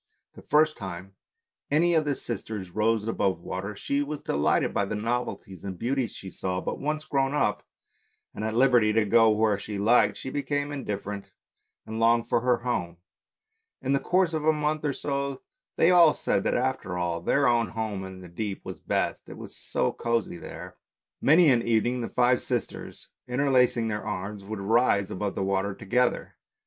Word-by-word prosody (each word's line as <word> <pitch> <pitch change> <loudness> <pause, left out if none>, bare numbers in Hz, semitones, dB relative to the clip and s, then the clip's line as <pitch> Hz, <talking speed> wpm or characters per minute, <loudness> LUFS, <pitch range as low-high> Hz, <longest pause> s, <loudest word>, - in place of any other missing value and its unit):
The - - -13
first 155 +1 +3
time 95 -1 -7 0.6
any 170 +4 +3
of 160 -2 +3
the 145 -1 0
sisters 105 -7 -5
rose 110 +2 +1
above 95 -5 0
the - - -21
water 95 +3 -4
she 140 +7 -1
was 145 +1 -4
delighted 70 - +1
by 100 - +1
the 105 - -3
novelties 105 -5 -3
and 95 -2 -5
beauties 125 +2 -1
she 95 - -8
saw; 90 -1 -3
but - - -4
once 155 +1 -2
grown 135 0 0
up, - - +1 0.7
and - - -6
at 110 0 -2
liberty 120 -4 +4
to 110 -1 +3
go 115 +2 +5
where 105 -1 +2
she 105 0 -5
liked, 105 0 +3
she 130 - -6
became 145 0 -2
indifferent 105 -7 -5 0.5
and 110 +1 -5
longed 115 0 +3
for 120 - +1
her 125 -1 +1
home; 90 -9 -2 0.8
in 135 +1 -1
the 140 - +3
course 180 +3 +1
of 155 -1 -1
a 160 - +5
month 150 0 -1
or 145 -2 0
so 140 -1 -3 0.3
they 165 - +4
all 170 -4 +6
said - - 0
that - - +1
after 125 -8 -2
all 85 -1 -1
their 140 +10 +2
own 120 -2 +3
home 110 -4 -4
in 95 -1 -9
the 90 - -10
deep 100 +3 -5
was - - -7
best, - - -2
it - - -9
was - - -9
so - - -1
cosy 115 -6 -2
there. - - -9 0.4
Many 155 +1 +6
an 120 -2 +3
evening 120 +2 +1
the 115 - -4
five 125 0 +3
sisters 120 -3 -4 0.2
interlacing 125 -3 +2
their 105 -1 -3
arms 100 +1 -5
would 105 0 -5
rise 100 -2 +2
above 100 +1 -3
the 95 - -1
water 95 +1 -1
together. 125 +5 0
115 Hz, 185 wpm, -27 LUFS, 100-135 Hz, 0.8 s, all